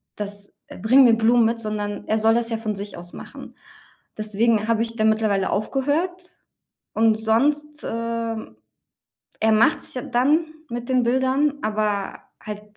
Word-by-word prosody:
Das 205 -1 -6 0.3
bring 255 +5 +6
mir 235 -2 +6
Blumen 230 +1 +4
mit, 230 0 0
sondern 210 -1 -4
er 220 - +1
soll 220 +1 +3
das 235 0 +1
ja 225 - -1
von 215 -2 -3
sich 200 +1 -6
aus 175 0 -10
machen. - - -11 0.6
Deswegen 215 +1 +1
habe 230 -1 +1
ich 230 0 -6
da 215 - -1
mittlerweile 215 -3 +2
aufgehört. 285 - -1 0.8
Und 220 0 +4
sonst, 295 +7 0
ähm, 230 - -4 0.8
er 220 0 +3
macht's 215 - +2
ja 250 - -4
dann 275 +8 +2 0.3
mit 240 +2 -5
den 255 -1 +3
Bildern, 260 +4 +2
aber 210 -2 -2 0.2
halt 210 -1 -7
225 Hz, 150 wpm, -23 LUFS, 215-245 Hz, 0.8 s, bring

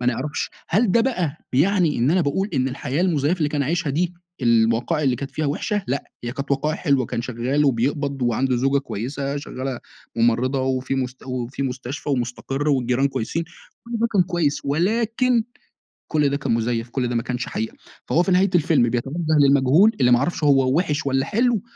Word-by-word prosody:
ما 125 - -2
نعرفش، 130 +4 -1 0.2
هل 205 +5 +2
ده 230 - +5
بقى 180 - -1 0.2
بيعني 165 +2 +2
إن 125 +5 +2
أنا 185 +3 +3
باقول 180 +6 0
إن 130 -1 +1
الحياة 135 +3 -3
المزيفة 170 -1 +1
اللي 150 -3 +1
كان 145 -1 -1
عايشها 165 +1 -1
دي، 175 +5 -1 0.3
الوقائع 115 +6 +2
اللي 130 -3 +2
كانت 140 +1 -6
فيها 155 - -2
وحشة، 205 +8 -1
لأ، 135 +2 -2 0.2
هي 120 - -3
كانت 140 +1 -6
وقائع 150 +3 0
حلوة، 140 -6 +1
كان 115 - -3
شغّال 130 +4 0
وبيقبض 140 +2 0
وعنده 125 +2 +1
زوجة 135 +3 +2
كويّسة 140 +3 -4
شغّالة 130 -2 -5 0.4
ممرضة 120 +3 +2
وفي 130 0 -1
مس 130 -1 -2
وفي 125 +1 -4
مستشفى 130 +2 -5
ومُسْتَقِرّ 135 +3 -2
والجيران 130 -1 +2
كويسين، 150 +6 -3 0.4
كل 235 - -10
ده 230 - +2
كان 195 - +4
كويّس 175 -5 0
ولكن 225 - +1 0.6
كل 150 -2 +2
ده 140 - -1
كان 135 - -1
مزيف، 115 0 -1
كل 125 0 -1
ده 120 - -2
ما 115 - 0
كانش 125 -1 -3
حقيقة. 110 +1 -4 0.3
فهو 175 - +2
في 190 - -1
نهاية 185 +1 +4
الفيلم 150 -7 +3
بيتوجه 125 +5 -2 0.2
للمجهول 140 +8 +5
اللي 125 -1 +4
ما 120 - +7
يعرفش 145 +5 -2
هو 135 -1 +4
وحِش 150 -5 0
والّا 135 -1 +1
حلو، 235 0 +1
140 Hz, 190 wpm, -22 LUFS, 125-165 Hz, 0.6 s, ما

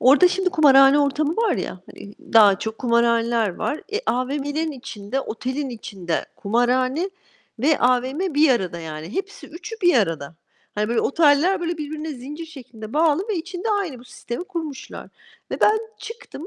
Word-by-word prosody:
Orada 290 +8 +6
şimdi 380 0 0
kumarhane 275 -5 +6
ortamı 295 +2 +1
var 455 -4 +2
ya, 185 - -5
hani, 205 +1 -12 0.2
daha 205 -4 +7
çok 220 +1 -5
kumarhaneler 235 -3 +2
var. 295 - -2
E, 430 - 0
AVM'lerin 285 +5 -1
içinde, 250 -2 -5
otelin 260 +3 -4
içinde 190 -8 -4
kumarhane 255 - +1 0.5
ve 290 +6 +2
AVM 260 +8 +1
bir 295 0 +5
arada 185 -8 0
yani. 160 +2 -7
Hepsi, 395 +1 -5
3'ü 355 +8 -8
bir 350 -2 +5
arada. 165 - 0 0.4
Hani 210 0 -1
böyle 235 0 +1
oteller, 320 +5 +3
böyle, 340 -1 -3
birbirine 310 +1 -5
zincir 290 +6 -8
şeklinde 240 -8 -11
bağlı 320 +6 +2
ve 425 - -1
içinde 360 +5 -4
aynı 390 -11 -1
bu 240 - -15
sistemi 240 +4 -7
kurmuşlar. 330 -7 -7 0.4
Ve - - -4
ben 430 +1 +5 0.2
çıktım, 450 -8 -9
275 Hz, 155 wpm, -22 LUFS, 235-330 Hz, 0.5 s, daha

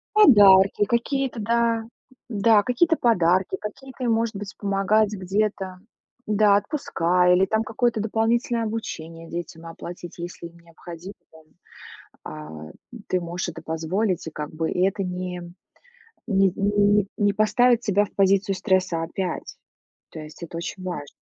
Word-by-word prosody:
Подарки, 205 - +7
какие-то, 245 +2 -1
да, 230 +1 +1 0.5
да, 215 -1 +4
какие-то 320 +8 +2
подарки, 185 - +2
какие-то 260 +4 -7
им, 230 - +2
может 225 0 0
быть, 205 0 -8
помогать 200 +1 +1
где-то, 190 -1 -2 0.5
да, 210 -1 +4
отпуска 180 - +1
или 185 +2 +4
там 220 +3 0
какое-то 225 0 0
дополнительное 230 +2 0
обучение 165 -7 -6
детям 170 -1 -7
оплатить, 170 +1 -9
если 170 0 -7
им 170 0 -18
необходимо 170 +2 -11 0.2
там, 160 -1 -18 0.8
а, 75 0 -9 0.4
ты 185 - 0
можешь 175 +1 -4
это 160 - -10
позволить, 170 +4 -2
и - - -4
как 150 -1 -6
бы, 160 0 -2
и 180 - +1
это 195 +1 0
не 180 -1 -5 0.8
не 195 -4 +3
не 205 0 +2
не 205 -1 +3
поставит 235 +3 +3
тебя 205 -2 +2
в 205 - -12
позицию 195 0 +2
стресса 185 -3 +1
опять. 180 +1 -5 0.5
То - - -10
есть 155 +2 -12
это 170 0 -7
очень 185 +2 -6
важно. 150 -6 -5
195 Hz, 140 wpm, -24 LUFS, 175-220 Hz, 0.8 s, Подарки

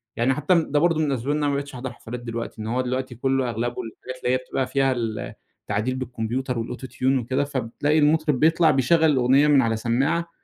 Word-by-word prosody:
يعني 120 +3 +2
حتى 150 +6 +2
ده 145 - +2
برضو 165 0 +2
من 155 - +2
الأسباب 135 +1 -1
إن 150 - +1
أنا 150 -1 0
ما - - 0
بقيتش 140 0 -4
أحضر 125 +1 -5
حفلات 120 +1 -8
دلوقتي، 115 -1 -6
إن 110 - -5
هو 125 +3 0
دلوقتي 130 0 -3
كلّه 130 +1 0
أغلبه 120 +1 -2
الحاجات 130 +3 -9
اللي 125 - +2
هي - - +3
بتبقى 130 0 -3
فيها 135 0 +1
ال 115 -4 -3 0.3
التعديل 110 +5 -2
بالكمبيوتر، 125 0 -3
والAuto 125 +3 -7
Tune 130 +1 +2
وكده، 130 +4 0
فبتلاقي 145 +2 -1
المطرب 150 -2 +2
بيطلع، 160 +2 +4
بيشغّل 155 +4 +3
الأغنية 135 +2 +4
من 145 -2 +5
على 115 -2 +1
سماعة 135 +9 0
130 Hz, 215 wpm, -24 LUFS, 120-145 Hz, 0.3 s, من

